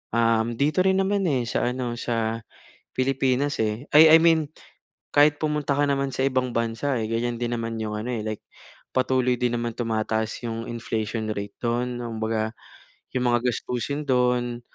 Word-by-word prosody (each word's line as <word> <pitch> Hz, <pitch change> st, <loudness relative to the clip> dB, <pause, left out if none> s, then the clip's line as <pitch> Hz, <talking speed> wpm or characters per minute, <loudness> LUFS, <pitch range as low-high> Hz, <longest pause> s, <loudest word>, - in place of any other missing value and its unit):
um, 115 Hz, 0 st, +2 dB
dito 150 Hz, +7 st, +2 dB
rin 190 Hz, 0 st, +3 dB
naman, 195 Hz, +1 st, +1 dB
eh 125 Hz, -3 st, +1 dB
sa -, -, 0 dB
ano 125 Hz, -2 st, -3 dB
sa 115 Hz, -1 st, -2 dB, 0.5 s
Pilipinas, 135 Hz, +1 st, +1 dB
eh, 110 Hz, +5 st, -2 dB
ay 160 Hz, +1 st, +9 dB
I -, -, +7 dB
mean 160 Hz, -3 st, +4 dB, 0.6 s
kahit 145 Hz, 0 st, +5 dB
pumunta 150 Hz, -2 st, 0 dB
ka 145 Hz, -, +3 dB
naman 140 Hz, -1 st, 0 dB
sa 130 Hz, -, +1 dB
ibang 130 Hz, -1 st, 0 dB
bansa, 115 Hz, +4 st, -1 dB
eh -, -, -1 dB
ganyan 120 Hz, +1 st, -1 dB
din 120 Hz, 0 st, -1 dB
naman 115 Hz, 0 st, -3 dB
yung 105 Hz, -1 st, -3 dB
ano, 115 Hz, -, -5 dB
eh, 115 Hz, -, -2 dB
like 110 Hz, -1 st, -4 dB, 0.5 s
patuloy 130 Hz, -1 st, +2 dB
din 125 Hz, 0 st, 0 dB
naman 115 Hz, -1 st, -3 dB
tumataas 110 Hz, -1 st, -2 dB
yung 115 Hz, 0 st, -4 dB
inflation 110 Hz, -1 st, -3 dB
rate 100 Hz, -1 st, -5 dB
doon 120 Hz, +1 st, -1 dB
kumbaga 110 Hz, -1 st, -2 dB, 0.6 s
yung 125 Hz, -1 st, +1 dB
mga 120 Hz, +1 st, +2 dB
gastusin 125 Hz, +5 st, -3 dB
doon 125 Hz, -1 st, +1 dB
120 Hz, 165 wpm, -25 LUFS, 115-135 Hz, 0.6 s, ay